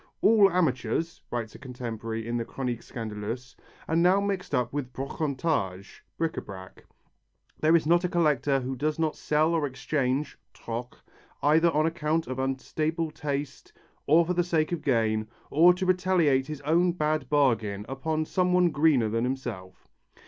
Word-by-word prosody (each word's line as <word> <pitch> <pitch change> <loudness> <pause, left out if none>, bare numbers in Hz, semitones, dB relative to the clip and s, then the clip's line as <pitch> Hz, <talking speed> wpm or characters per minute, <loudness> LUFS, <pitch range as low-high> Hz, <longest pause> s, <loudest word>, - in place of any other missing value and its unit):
"All 210 -2 +6
amateurs," 160 - -1
writes 115 -2 -4
a - - -12
contemporary 115 -3 -5
in 120 - -2
the 115 - -1
Chronique 125 -1 -4
Scandaleuse, 115 +3 -6 0.3
"are 160 - 0
now 180 +4 +4
mixed 200 -2 -2
up 125 0 -1
with 140 -3 -3
brocantage 135 - -3
(bric 165 -1 -1
à - - -5
brac). 95 -2 -11 0.7
There 160 +2 +4
is 160 - +3
not 170 +3 +3
a 180 - 0
collector 145 -5 +2
who 130 +1 -4
does 150 +4 -1
not 160 -2 0
sell 155 +2 +1
or 160 -3 +1
exchange 135 +1 -2 0.2
(troque), 120 +2 -6 0.5
either 160 +3 +5
on 155 -1 +1
account 160 0 0
of 130 0 -5
unstable 155 +5 -2
taste, 145 -2 -5 0.3
or 165 +3 +5
for 180 - -1
the 175 0 +2
sake 165 -2 0
of 175 - -2
gain, 110 -5 +1 0.2
or 170 +4 +7
to 185 +1 -2
retaliate 180 -7 +2
his 150 -2 -6
own 170 +4 +2
bad 155 -5 -1
bargain 110 -8 +1
upon 155 +4 -2
some 180 +2 +1
one 180 -1 +4
greener 145 -6 +3
than 115 +2 -1
himself." 120 -8 -5
145 Hz, 165 wpm, -27 LUFS, 125-165 Hz, 0.7 s, or